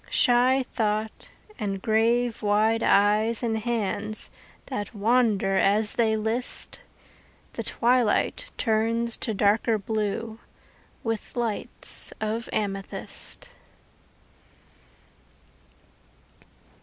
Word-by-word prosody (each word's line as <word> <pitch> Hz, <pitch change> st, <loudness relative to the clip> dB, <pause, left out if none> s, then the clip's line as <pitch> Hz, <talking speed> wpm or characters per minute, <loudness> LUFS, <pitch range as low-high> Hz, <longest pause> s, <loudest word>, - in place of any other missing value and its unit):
Shy 255 Hz, +2 st, +3 dB
thought 215 Hz, -3 st, -3 dB, 0.3 s
and 195 Hz, -2 st, -2 dB
grave 230 Hz, +3 st, +1 dB
wide 215 Hz, +2 st, +2 dB
eyes 215 Hz, +4 st, +3 dB
and 225 Hz, -2 st, 0 dB
hands 215 Hz, -2 st, -2 dB, 0.3 s
That 205 Hz, -5 st, -5 dB
wander 210 Hz, -3 st, +2 dB
as 210 Hz, +2 st, +3 dB
they 220 Hz, -2 st, +2 dB
list 225 Hz, +3 st, 0 dB, 0.7 s
The -, -, -4 dB
twilight 245 Hz, -, +1 dB
turns 230 Hz, +1 st, +1 dB
to 220 Hz, -4 st, -2 dB
darker 215 Hz, +3 st, +2 dB
blue 220 Hz, +2 st, -3 dB, 0.6 s
With 225 Hz, -2 st, -3 dB
lights 235 Hz, -3 st, -1 dB
of 220 Hz, +2 st, -3 dB
amethyst. 195 Hz, -2 st, -3 dB
220 Hz, 80 wpm, -25 LUFS, 210-235 Hz, 0.7 s, Shy